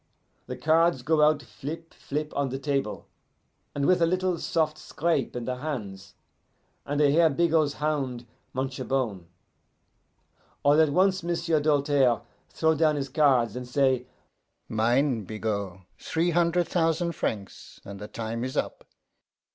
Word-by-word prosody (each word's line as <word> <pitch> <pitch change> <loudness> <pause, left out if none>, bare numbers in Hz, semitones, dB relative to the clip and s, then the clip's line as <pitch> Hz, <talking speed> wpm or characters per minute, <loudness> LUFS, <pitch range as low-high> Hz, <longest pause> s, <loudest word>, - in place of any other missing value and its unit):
The - - -5
cards 160 -3 +2
go 155 +2 +2
out 150 -1 +4
flip, 165 +4 -8
flip, 150 +1 -4
on 140 -1 0
the 135 - -3
table, 135 -5 -2 0.7
and 140 -1 0
with 180 +1 +3
a 165 - +5
little 185 0 0
soft 155 -3 0
scrape 160 -6 -1
in 120 -1 -4
the 125 0 -3
hands, 105 -9 -6 0.7
and 145 +1 -1
I 145 -2 +5
hear 165 +2 +5
Bigot's 155 -1 +2
hound 135 -6 -2 0.3
much 130 +1 -3
a - - -2
bone. 110 -10 -2 1.4
All 145 +2 +5
at 155 - +4
once 185 +5 +2
M'sieu' 170 -2 0
Doltaire 145 -5 +2 0.3
throw 160 0 +2
down 155 -1 +2
his 140 -2 -3
cards, 130 -6 +3
and 125 0 -6
say, 130 -1 +1 0.6
'Mine, 120 +1 +1
Bigot! 100 -3 -4 0.2
Three 170 +2 0
hunder' 175 +1 +2
thousan' 170 0 0
francs, 105 -10 -5
and 100 0 -8
the 105 - -7
time 115 +1 -4
is 130 +1 -4
up! - - -2
145 Hz, 145 wpm, -27 LUFS, 125-160 Hz, 1.4 s, a